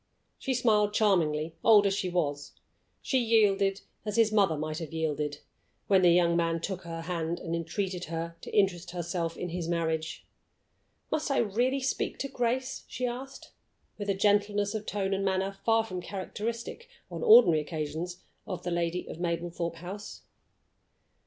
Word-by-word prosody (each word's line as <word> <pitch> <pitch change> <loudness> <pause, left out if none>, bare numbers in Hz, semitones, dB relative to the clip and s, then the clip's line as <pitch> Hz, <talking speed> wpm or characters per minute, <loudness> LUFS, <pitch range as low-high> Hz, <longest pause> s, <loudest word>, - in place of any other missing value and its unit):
She 265 - -1
smiled 210 -4 +3
charmingly, 165 -7 +2
old 210 -3 +7
as 195 - +3
she 195 -2 -1
was 145 -5 -2 0.5
she 260 - +2
yielded 205 -4 +3 0.2
as 210 -2 -3
his 225 -2 +4
mother 195 -7 +3
might 155 +1 -3
have 165 -3 -6
yielded 150 -2 -2 0.4
when 190 -2 +4
the 180 - +6
young 170 0 +4
man 165 -1 +1
took 185 +2 -4
her 165 -2 -6
hand 165 0 -2
and 165 -1 -3
entreated 180 +2 -3
her 165 +1 -4
to - - -8
interest 185 -3 +2
herself 170 -1 -3
in 180 - -4
his 170 -1 -3
marriage. 160 -2 -2 0.9
"Must 310 -1 0
I 275 - +1
really 245 +6 +1
speak 260 - -1
to 275 - -3
Grace?" 255 +1 -1
she 255 - -3
asked, 255 +3 -6 0.5
with 205 -1 -3
a 200 - +2
gentleness 205 +1 +2
of 215 -1 -4
tone 195 -1 -1
and 195 0 -1
manner 190 0 0
far 225 0 +3
from 185 -5 -5
characteristic, 230 - -5 0.2
on - - -5
ordinary 450 - +7
occasions, 160 +3 -5 0.2
of 185 -4 -5
the 175 - -2
lady 170 +1 -1
of - - -8
Mablethorpe 170 0 -2
House. 185 +5 -8
185 Hz, 165 wpm, -29 LUFS, 170-210 Hz, 0.9 s, old